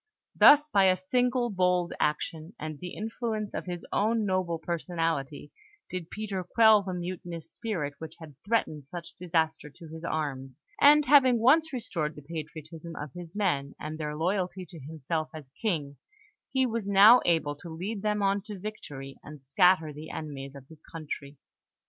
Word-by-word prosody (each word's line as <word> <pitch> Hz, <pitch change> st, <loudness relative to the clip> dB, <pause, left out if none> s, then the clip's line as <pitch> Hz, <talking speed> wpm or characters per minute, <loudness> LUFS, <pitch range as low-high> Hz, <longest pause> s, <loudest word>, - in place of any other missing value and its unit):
Thus, 295 Hz, +1 st, +8 dB
by 200 Hz, -8 st, +4 dB
a 185 Hz, -1 st, +4 dB
single 245 Hz, +5 st, +1 dB
bold 180 Hz, -2 st, +1 dB
action, 155 Hz, +3 st, -2 dB
and 155 Hz, -1 st, -6 dB
the 180 Hz, -1 st, -7 dB
influence 220 Hz, -1 st, -3 dB
of -, -, -5 dB
his 175 Hz, -1 st, -5 dB
own 220 Hz, +1 st, +2 dB
noble 185 Hz, -3 st, 0 dB
personality, 165 Hz, -4 st, -3 dB, 0.4 s
did 180 Hz, -3 st, -5 dB
Peter 200 Hz, -3 st, -4 dB
quell 220 Hz, +3 st, +5 dB
the 185 Hz, -2 st, -4 dB
mutinous 175 Hz, -2 st, -6 dB
spirit 170 Hz, -11 st, -3 dB
which 160 Hz, -, -8 dB
had 160 Hz, -3 st, -11 dB
threatened 175 Hz, -, -1 dB
such 170 Hz, +3 st, -8 dB
disaster 160 Hz, -3 st, -1 dB
to 165 Hz, +3 st, -13 dB
his 160 Hz, +1 st, -9 dB
arms; 135 Hz, -5 st, -3 dB, 0.2 s
and, 295 Hz, +1 st, +7 dB
having 260 Hz, -3 st, +6 dB
once 310 Hz, +8 st, +4 dB
restored 165 Hz, -, -3 dB
the 150 Hz, -, -11 dB
patriotism 160 Hz, +1 st, -8 dB
of 145 Hz, -2 st, -7 dB
his 175 Hz, 0 st, -10 dB
men, 145 Hz, -9 st, 0 dB
and 155 Hz, +1 st, -6 dB
their 150 Hz, -1 st, -3 dB
loyalty 185 Hz, +2 st, -1 dB
to 165 Hz, -, -10 dB
himself 155 Hz, +2 st, -4 dB
as 145 Hz, -4 st, -10 dB
King, 150 Hz, -10 st, -1 dB, 0.5 s
he 265 Hz, -1 st, +2 dB
was 230 Hz, -4 st, -2 dB
now 205 Hz, +5 st, +8 dB
able 160 Hz, -4 st, +1 dB
to 170 Hz, -, -10 dB
lead 190 Hz, +6 st, -4 dB
them 210 Hz, -1 st, 0 dB
on 200 Hz, +1 st, +2 dB
to 210 Hz, -2 st, -6 dB
victory, 145 Hz, -10 st, -8 dB
and 150 Hz, -2 st, -11 dB
scatter 160 Hz, +2 st, +3 dB
the 150 Hz, +2 st, -9 dB
enemies 140 Hz, -3 st, -6 dB
of 135 Hz, -1 st, -12 dB
his 160 Hz, 0 st, -16 dB
country. 150 Hz, -3 st, -6 dB
170 Hz, 165 wpm, -28 LUFS, 155-205 Hz, 0.5 s, Thus